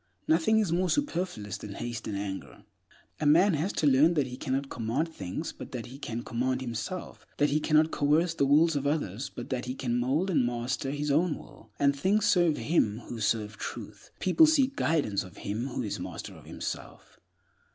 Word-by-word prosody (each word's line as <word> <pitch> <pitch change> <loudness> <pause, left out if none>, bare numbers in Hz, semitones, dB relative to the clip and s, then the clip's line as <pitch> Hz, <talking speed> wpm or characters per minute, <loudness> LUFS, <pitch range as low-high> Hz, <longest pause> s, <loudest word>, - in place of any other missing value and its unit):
Nothing 165 +7 +4
is 210 -6 +2
more 180 +2 +1
superfluous 175 - -1
than 100 -2 -8
haste 120 -1 -5
and 100 - -3
anger. 100 -1 -6 0.6
A 150 - +1
man 175 +6 +6
has 160 +6 0
to - - 0
learn 145 +5 +5
he 130 -5 0
cannot 135 +2 -2
command 125 +8 -1
things, 95 - -4
but - - -10
that 120 -3 -4
he 135 +3 -10
can 120 -4 -4
command 130 +2 -1
himself; 130 - -5
that 145 -1 +3
he 150 - +3
cannot 155 +1 +3
coerce 155 +4 +2
the 140 -4 +1
wills 155 +3 +5
of 140 0 0
others, 140 - -1
but - - -8
that 125 -1 -2
he 125 +1 -4
can 120 -2 -1
mold 145 +10 +1
and 155 - +3
master 120 +3 -2
his 145 +1 -1
own 160 +2 +2
will: - - -15
and 140 0 +3
things 195 +9 +2
serve 175 -6 +4
him 115 -5 +1
who 120 - -5
serve 110 0 0
Truth. - - -7
People 250 - +5
seek 275 -3 +3
guidance 150 - +1
of 90 -3 -13
him 110 +6 -3
who 125 -1 -3
is 105 - -3
master - - -6
of - - -14
himself. - - -7
140 Hz, 195 wpm, -29 LUFS, 120-165 Hz, 0.6 s, man